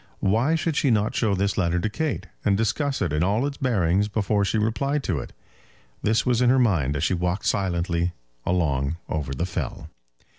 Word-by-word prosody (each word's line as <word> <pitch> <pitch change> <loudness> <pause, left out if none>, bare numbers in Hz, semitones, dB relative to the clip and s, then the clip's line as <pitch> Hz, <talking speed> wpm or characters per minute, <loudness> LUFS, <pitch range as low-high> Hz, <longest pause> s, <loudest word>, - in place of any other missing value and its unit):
Why 115 +11 +2
should 160 -1 -1
she 150 -2 +2
not 105 -2 +2
show 105 -4 +1
this 100 +1 0
letter 85 -1 +1
to 100 - 0
Kate, 140 -3 -2 0.2
and 100 -1 +2
discuss 135 +4 0
it 85 -5 -1
in 75 +2 +1
all 105 +8 +1
its 140 -1 -3
bearings 100 -6 +1
before 105 -1 0
she 100 - 0
replied 135 +7 0
to 85 -10 -1
it? - - -7 0.7
This 110 +2 +2
was 125 -1 +2
in 125 - +4
her 130 - +5
mind 85 - +2
as 70 - -1
she 85 - +2
walked 90 +2 -1
silently 85 -2 0 0.3
along 75 -4 0
over 75 -4 -3
the 85 - -1
fell. 90 - -5
100 Hz, 195 wpm, -24 LUFS, 85-120 Hz, 0.7 s, her